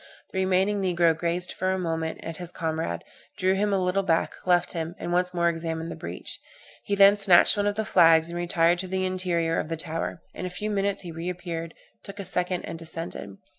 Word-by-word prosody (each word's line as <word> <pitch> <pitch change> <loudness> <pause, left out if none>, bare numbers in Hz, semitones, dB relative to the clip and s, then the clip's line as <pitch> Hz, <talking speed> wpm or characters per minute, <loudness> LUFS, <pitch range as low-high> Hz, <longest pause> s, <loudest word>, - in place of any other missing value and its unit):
The 190 - -2
remaining 190 +2 +2
negro 175 -3 +3
gazed 170 +2 -1
for 185 +1 -1
a 190 - 0
moment 165 -2 -3
on 165 - -4
his 175 +1 -4
comrade, 160 - -3 0.3
drew 185 +1 +2
him 205 +2 +1
a 195 - +2
little 185 +1 +1
back, 165 -4 +1
left 175 -1 +3
him, 165 0 -4
and 175 - -4
once 180 0 +2
more 170 -1 +1
examined 165 -1 -2
the - - -5
breach. 85 +1 -5 0.5
He 205 - 0
then 200 +1 +7
snatched 195 -1 +6
one 205 0 0
of 205 - 0
the 220 0 -1
flags, 165 -4 +5
and 170 - -6
retired 175 0 +2
to 185 - -4
the 185 0 -1
interior 175 -3 0
of - - -4
the 165 - -2
tower; 165 0 -4
in 185 - -4
a - - -5
few 210 +4 -4
minutes 200 -1 -1
he 175 - -7
re 165 +2 -4
appeared, 170 -2 -5 0.3
took 200 +1 -9
a 200 - -5
second 180 0 -1
and 165 - -6
descended. 165 -11 -7
175 Hz, 220 wpm, -26 LUFS, 165-190 Hz, 0.5 s, then